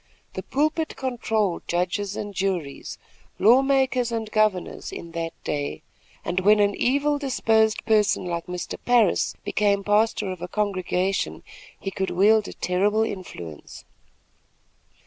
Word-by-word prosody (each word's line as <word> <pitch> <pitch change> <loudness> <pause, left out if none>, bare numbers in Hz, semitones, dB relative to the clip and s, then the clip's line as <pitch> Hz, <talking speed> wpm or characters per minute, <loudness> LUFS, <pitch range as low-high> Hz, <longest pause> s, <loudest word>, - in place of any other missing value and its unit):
The - - -4
pulpit 310 +3 -1
controlled 225 -7 -1
judges 185 +3 -1
and 205 -1 -5
juries, 180 -7 -3 0.4
law 235 +7 +6
makers 265 -3 +1
and 225 -2 -3
governors 215 -4 0
in 170 - -8
that 165 0 -4
day, 145 -1 -3 0.4
and 180 - 0
when 210 +3 +5
an 205 0 +3
evil 285 +5 +1
disposed 225 -5 +1
person 210 -4 +2
like 170 -1 -3
Mr. 180 0 -5
Parris 240 -6 +3
became 200 -1 +1
pastor 210 -1 +1
of 185 -2 -7
a 180 - -4
congregation, 195 -1 -1 0.4
he 195 - -4
could 190 0 -2
wield 210 +3 +4
a - - -7
terrible 205 +4 +1
influence. 90 - -7
205 Hz, 130 wpm, -24 LUFS, 180-225 Hz, 0.4 s, law